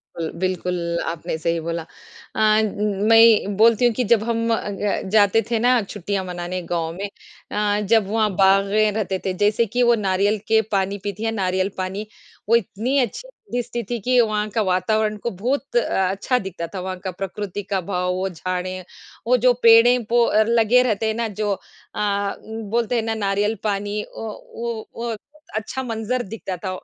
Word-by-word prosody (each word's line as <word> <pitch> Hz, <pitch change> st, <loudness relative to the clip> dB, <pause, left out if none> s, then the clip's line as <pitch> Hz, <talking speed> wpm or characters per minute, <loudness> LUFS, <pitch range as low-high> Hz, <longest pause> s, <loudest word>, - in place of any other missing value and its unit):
कुल 165 Hz, -1 st, -3 dB
बिल्कुल 180 Hz, -1 st, -1 dB, 0.3 s
आपने 160 Hz, -1 st, -4 dB
सही 165 Hz, +1 st, -1 dB
बोला। 170 Hz, 0 st, -2 dB, 0.5 s
अ 215 Hz, 0 st, +4 dB
उम, 210 Hz, -1 st, -1 dB
मैं 225 Hz, -3 st, +6 dB
बोलती 230 Hz, +2 st, +5 dB
हूँ 240 Hz, -, +3 dB
कि 250 Hz, -, 0 dB
जब 220 Hz, -2 st, +5 dB
हम 230 Hz, 0 st, -1 dB
अ 225 Hz, -, +2 dB
अ, 205 Hz, 0 st, -2 dB
जाते 210 Hz, +1 st, +4 dB
थे 230 Hz, -2 st, +1 dB
ना 245 Hz, 0 st, +4 dB
छुट्टियाँ 200 Hz, 0 st, -3 dB
मनाने 180 Hz, 0 st, -4 dB
गाँव 165 Hz, -1 st, -1 dB
में 200 Hz, -, -3 dB, 0.5 s
अ, 210 Hz, 0 st, +1 dB
जब 210 Hz, -1 st, +2 dB
वहाँ 215 Hz, -1 st, +2 dB
बागें 200 Hz, +2 st, +4 dB
रहते 195 Hz, -3 st, -2 dB
थे, 190 Hz, -, 0 dB
जैसे 210 Hz, +4 st, +2 dB
कि 245 Hz, +3 st, 0 dB
वो 240 Hz, 0 st, +5 dB
नारियल 200 Hz, +1 st, +1 dB
के 220 Hz, 0 st, +4 dB
पानी 195 Hz, 0 st, 0 dB
पीती 205 Hz, +1 st, -4 dB
है, 225 Hz, -, 0 dB
नारियल 190 Hz, -2 st, 0 dB
पानी 190 Hz, +3 st, -4 dB, 0.4 s
वो 230 Hz, -, +6 dB
इतनी 230 Hz, +5 st, 0 dB
अच्छी 255 Hz, -, -2 dB, 0.2 s
दिस 245 Hz, -1 st, -2 dB
थी, 235 Hz, -, -1 dB
थी 235 Hz, +3 st, -4 dB
कि 250 Hz, +4 st, +2 dB
वहाँ 215 Hz, -1 st, 0 dB
का 220 Hz, +1 st, 0 dB
वातावरण 210 Hz, +3 st, +1 dB
को 235 Hz, -, 0 dB
बहुत 275 Hz, +3 st, -2 dB
अ, 190 Hz, -5 st, +1 dB
अच्छा 225 Hz, +6 st, 0 dB
दिखता 170 Hz, -3 st, -5 dB
था 185 Hz, -, -3 dB
वहाँ 185 Hz, 0 st, -4 dB
का 185 Hz, 0 st, -4 dB
प्रकृति 195 Hz, +2 st, -5 dB
का 190 Hz, -, +1 dB
भाव, 180 Hz, 0 st, -1 dB
वो 190 Hz, +1 st, -2 dB
झाड़ें, 185 Hz, +1 st, -4 dB, 0.4 s
वो 250 Hz, +1 st, +5 dB
जो 250 Hz, +1 st, +4 dB
पेड़े 230 Hz, +2 st, +7 dB
पो 235 Hz, 0 st, +4 dB
आर 220 Hz, 0 st, +4 dB
लगे 235 Hz, +1 st, +4 dB
रहते 220 Hz, -2 st, 0 dB
हैं 220 Hz, -, +1 dB
ना 230 Hz, 0 st, -1 dB
जो 205 Hz, -, +1 dB
अ 200 Hz, 0 st, -3 dB
उम, 220 Hz, 0 st, -7 dB
बोलते 235 Hz, +1 st, 0 dB
हैं 230 Hz, -, +1 dB
ना 225 Hz, 0 st, -1 dB
नारियल 205 Hz, +3 st, +1 dB
पानी 205 Hz, 0 st, -1 dB
अ, -, -, -14 dB
वो 225 Hz, +1 st, -6 dB
वो 230 Hz, -1 st, -3 dB, 0.4 s
अच्छा 220 Hz, +5 st, -3 dB
मंजर 230 Hz, +1 st, -2 dB
दिखता 195 Hz, -3 st, -5 dB
था। 185 Hz, +2 st, -5 dB
210 Hz, 190 wpm, -22 LUFS, 190-230 Hz, 0.5 s, पेड़े